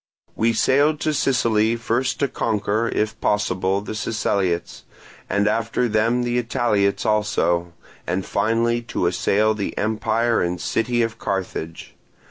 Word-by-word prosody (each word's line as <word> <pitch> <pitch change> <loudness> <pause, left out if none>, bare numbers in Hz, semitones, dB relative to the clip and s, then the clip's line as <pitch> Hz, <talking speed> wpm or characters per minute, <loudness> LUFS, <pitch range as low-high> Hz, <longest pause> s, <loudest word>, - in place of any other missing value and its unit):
We 115 +1 +2
sailed 145 +6 +3
to 155 - 0
Sicily 115 -5 +2
first 120 +2 -1
to 140 - +3
conquer, 110 -1 -1
if 110 +1 -2
possible, 95 -1 0
the 105 - -6
Siceliots, 100 -5 -1 0.5
and 100 0 +1
after 115 +2 0
them 115 +3 +1
the 120 0 0
Italiots 105 -4 0
also, 85 -5 +1 0.3
and 90 +2 -1
finally 115 +1 +1
to 115 - -3
assail 100 +5 +2
the 105 -2 -4
empire 115 +2 +1
and 90 0 -1
city 120 +6 0
of 115 0 -4
Carthage. 90 -4 -4
110 Hz, 130 wpm, -22 LUFS, 100-115 Hz, 0.5 s, sailed